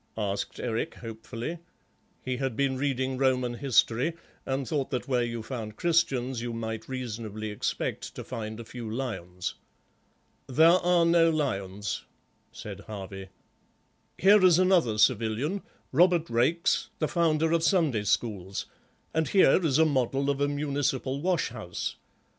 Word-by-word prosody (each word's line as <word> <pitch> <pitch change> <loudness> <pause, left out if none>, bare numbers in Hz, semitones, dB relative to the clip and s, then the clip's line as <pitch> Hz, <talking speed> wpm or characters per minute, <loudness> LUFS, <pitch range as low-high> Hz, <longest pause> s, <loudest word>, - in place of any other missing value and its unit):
asked 100 -2 -3
Eric 115 -2 -2
hopefully. 115 +7 -6 0.7
He 130 -1 -1
had 135 -3 -2
been 135 0 +1
reading 130 -1 -1
Roman 130 -2 +2
history 130 +3 +2 0.3
and 135 -1 -1
thought 145 -4 -1
that 125 +1 -3
where 125 -3 +2
you 115 -1 -3
found 110 -4 -6
Christians 130 -7 +1
you 120 0 -4
might 110 0 -5
reasonably 110 -4 -5
expect 105 - -3
to - - -6
find 110 0 -6
a 115 - -7
few 120 -1 -7
lions. 90 -8 -4 0.9
"There 160 +6 +6
are 175 -1 +4
no 165 0 +5
lions," 105 -10 -2 0.5
said - - -8
Harvey. 95 -2 -8 0.9
"Here 200 +1 +6
is 180 -3 +7
another 180 - +3
civilian, 120 - +2 0.3
Robert 170 +1 +3
Raikes, 130 +9 +2
the 155 - 0
founder 160 -1 +2
of 165 -1 +3
Sunday 160 - +2
schools, 100 -3 -1 0.5
and 160 -1 +1
here 190 -1 +5
is 145 -4 +2
a 160 - +5
model 135 -1 +1
of 140 0 -3
a 145 - +3
municipal 140 -2 -1
wash 180 0 +1
house. 110 -7 -5
130 Hz, 140 wpm, -28 LUFS, 115-155 Hz, 0.9 s, is